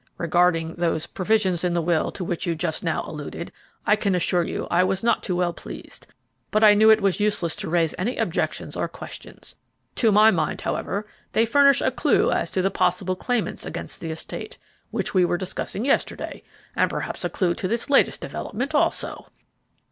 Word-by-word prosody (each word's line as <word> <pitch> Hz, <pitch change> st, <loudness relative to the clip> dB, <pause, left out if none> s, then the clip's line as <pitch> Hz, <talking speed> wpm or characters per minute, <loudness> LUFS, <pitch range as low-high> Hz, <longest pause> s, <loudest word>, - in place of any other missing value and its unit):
Regarding 165 Hz, -1 st, +2 dB
those 165 Hz, -2 st, 0 dB
provisions 190 Hz, -3 st, 0 dB
in 180 Hz, -1 st, +1 dB
the 170 Hz, -, +1 dB
will 165 Hz, -1 st, +1 dB
to 185 Hz, -, -5 dB
which 175 Hz, +1 st, -3 dB
you 170 Hz, -, 0 dB
just 160 Hz, -1 st, -2 dB
now -, -, -1 dB
alluded, -, -, -7 dB, 0.3 s
I 210 Hz, -, +5 dB
can 200 Hz, -3 st, 0 dB
assure 180 Hz, 0 st, +2 dB
you -, -, -3 dB
I 175 Hz, +1 st, +4 dB
was 190 Hz, +2 st, -1 dB
not 235 Hz, -, +2 dB
too 180 Hz, -, -2 dB
well 175 Hz, -1 st, 0 dB
pleased; -, -, -10 dB, 0.4 s
but 215 Hz, +1 st, +2 dB
I 210 Hz, -1 st, +9 dB
knew 215 Hz, +1 st, +5 dB
it 220 Hz, 0 st, +6 dB
was 195 Hz, -1 st, +1 dB
useless 205 Hz, -6 st, 0 dB
to 200 Hz, -4 st, -3 dB
raise 165 Hz, -2 st, +2 dB
any 230 Hz, +8 st, -1 dB
objections -, -, -2 dB
or -, -, -1 dB
questions; -, -, -10 dB, 0.4 s
to 225 Hz, -3 st, +4 dB
my 215 Hz, +2 st, +6 dB
mind, 160 Hz, -5 st, -1 dB
however, 200 Hz, +2 st, -2 dB, 0.3 s
they 225 Hz, -, +3 dB
furnish 280 Hz, +4 st, +5 dB
a -, -, +1 dB
clue -, -, +2 dB
as -, -, 0 dB
to 185 Hz, -, -1 dB
the 195 Hz, -, +1 dB
possible 185 Hz, +1 st, 0 dB
claimants 240 Hz, +4 st, -2 dB
against -, -, -5 dB
the 165 Hz, -, -5 dB
estate, 160 Hz, -, -6 dB, 0.3 s
which -, -, -2 dB
we 185 Hz, -2 st, +4 dB
were 175 Hz, 0 st, +1 dB
discussing 190 Hz, +4 st, -4 dB
yesterday, 275 Hz, -, -1 dB, 0.3 s
and -, -, +2 dB
perhaps -, -, -4 dB
a -, -, 0 dB
clue 180 Hz, -4 st, 0 dB
to 185 Hz, -, -3 dB
this 230 Hz, +4 st, -1 dB
latest 285 Hz, -1 st, +3 dB
development, 260 Hz, +8 st, -4 dB
also." 295 Hz, -, 0 dB
185 Hz, 195 wpm, -24 LUFS, 175-215 Hz, 0.4 s, I